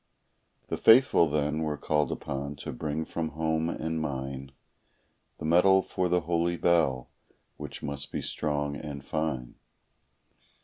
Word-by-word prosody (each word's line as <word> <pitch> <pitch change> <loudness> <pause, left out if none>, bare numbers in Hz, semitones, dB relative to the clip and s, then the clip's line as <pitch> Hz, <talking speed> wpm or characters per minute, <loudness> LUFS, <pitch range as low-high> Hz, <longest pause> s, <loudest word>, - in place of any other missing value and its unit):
The - - -1
faithful 115 -7 +6
then 75 +1 0
were 75 -2 -1
called 75 0 0
upon 70 +1 -4
to - - -6
bring 75 +4 -3
from 80 -1 -3
home 80 0 0
and 80 -1 -2
mine 65 -2 -4 0.9
The - - -6
metal 95 +4 +5
for 90 -1 -1
the 90 0 +2
holy 85 +1 0
bell, 80 -9 +2 0.5
which - - -8
must 70 -1 -5
be - - -3
strong 75 -1 -2
and 70 -1 -7
fine. 70 -6 -3
75 Hz, 135 wpm, -28 LUFS, 70-85 Hz, 0.9 s, faithful